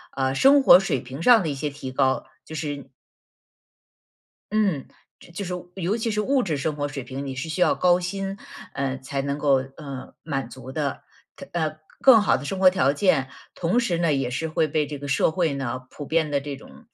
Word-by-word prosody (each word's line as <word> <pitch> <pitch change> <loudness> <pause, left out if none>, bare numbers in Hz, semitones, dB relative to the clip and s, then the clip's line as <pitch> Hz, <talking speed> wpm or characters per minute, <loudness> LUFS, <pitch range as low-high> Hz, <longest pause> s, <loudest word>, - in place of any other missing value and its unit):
呃 130 0 0
生 275 - +6
活 180 - +9
水 155 -10 -1
平 130 +5 -8
上 235 +2 +6
的 160 - -2
一 145 - -1
些 145 +2 -2
提 140 -2 -7
高， 130 0 +1 0.2
就 160 - -10 0.2
是 140 -1 -7 1.6
嗯 200 -10 +1 0.3
就 170 - -16
就 200 +4 -5
是 180 0 -4 0.3
尤 185 +6 0
其 225 0 -2
是 210 0 0
物 265 +3 +2
质 160 -6 -1
生 150 +2 -2
活 145 - -1
水 140 -1 -6
平， 135 +2 -6
你 135 - -4
是 135 +5 -5
需 160 - -3
要 - - +4
高 180 0 +3
薪， 195 +2 -4 0.4
呃， 135 -1 -2
才 135 +1 -4
能 140 +1 -2
够， 140 -3 +2
呃， 140 -4 -8
满 135 -6 -3
足 130 +2 -10
的， 145 -2 -3 0.5
呃 160 -3 0
它 155 - -18 0.2
更 250 -5 +8
好 205 - +3
的 130 - -7
生 190 +7 -3
活 185 -1 +7
条 180 -7 +2
件。 145 -5 +2 0.3
同 180 +8 +1
时 190 -8 0
呢， 165 -3 +2
也 135 -3 0
是 150 +6 -3
会 155 0 +1
被 150 0 0
这 145 0 -6
个 145 - -7
社 140 - +2
会 160 -3 0
呢， 130 -2 -4
普 145 - -8
遍 160 0 0
地 140 -1 +1
这 140 -1 -6
种 220 - -16
150 Hz, 235 characters per minute, -24 LUFS, 135-180 Hz, 1.6 s, 活